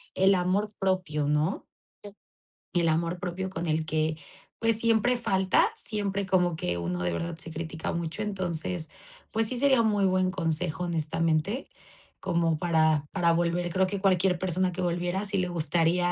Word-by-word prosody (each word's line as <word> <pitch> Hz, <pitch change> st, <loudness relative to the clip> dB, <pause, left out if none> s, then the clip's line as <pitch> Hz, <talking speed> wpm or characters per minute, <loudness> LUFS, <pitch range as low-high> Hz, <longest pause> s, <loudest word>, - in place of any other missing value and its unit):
el 190 Hz, +1 st, +5 dB
amor 190 Hz, +4 st, 0 dB
propio, 180 Hz, -6 st, 0 dB
¿no? 150 Hz, +5 st, 0 dB, 1.1 s
El 170 Hz, -1 st, +2 dB
amor 165 Hz, +2 st, 0 dB
propio 185 Hz, +1 st, -3 dB
con 170 Hz, -2 st, -4 dB
el 160 Hz, -1 st, 0 dB
que, 155 Hz, 0 st, 0 dB, 0.4 s
pues 225 Hz, -1 st, +2 dB
siempre 230 Hz, +2 st, +3 dB
falta, 190 Hz, -, +2 dB
siempre 200 Hz, -, -2 dB
como 180 Hz, -3 st, +2 dB
que 90 Hz, -, -1 dB
uno 90 Hz, +1 st, -3 dB
de 90 Hz, 0 st, 0 dB
verdad 170 Hz, -, -3 dB
se 165 Hz, -, -7 dB
critica 160 Hz, 0 st, -4 dB
mucho, 170 Hz, +3 st, -3 dB
entonces, 180 Hz, -4 st, -3 dB, 0.4 s
pues 225 Hz, 0 st, +1 dB
sí 250 Hz, -, -2 dB
sería 265 Hz, -2 st, +4 dB
un 225 Hz, -, +2 dB
muy 205 Hz, -2 st, +2 dB
buen 185 Hz, 0 st, +2 dB
consejo, 170 Hz, -2 st, -1 dB
honestamente, 165 Hz, -, -1 dB, 0.5 s
como 165 Hz, -2 st, 0 dB
para 160 Hz, -3 st, +2 dB
para 175 Hz, -3 st, +2 dB
volver. 175 Hz, +1 st, 0 dB
Creo 190 Hz, 0 st, +3 dB
que 200 Hz, +1 st, -3 dB
cualquier 185 Hz, -1 st, +3 dB
persona 185 Hz, +1 st, 0 dB
que 180 Hz, -, -4 dB
volviera, 175 Hz, +3 st, -1 dB
sí 200 Hz, -1 st, -1 dB
le 180 Hz, -, 0 dB
gustaría 175 Hz, +1 st, +1 dB
175 Hz, 165 wpm, -27 LUFS, 160-190 Hz, 1.1 s, el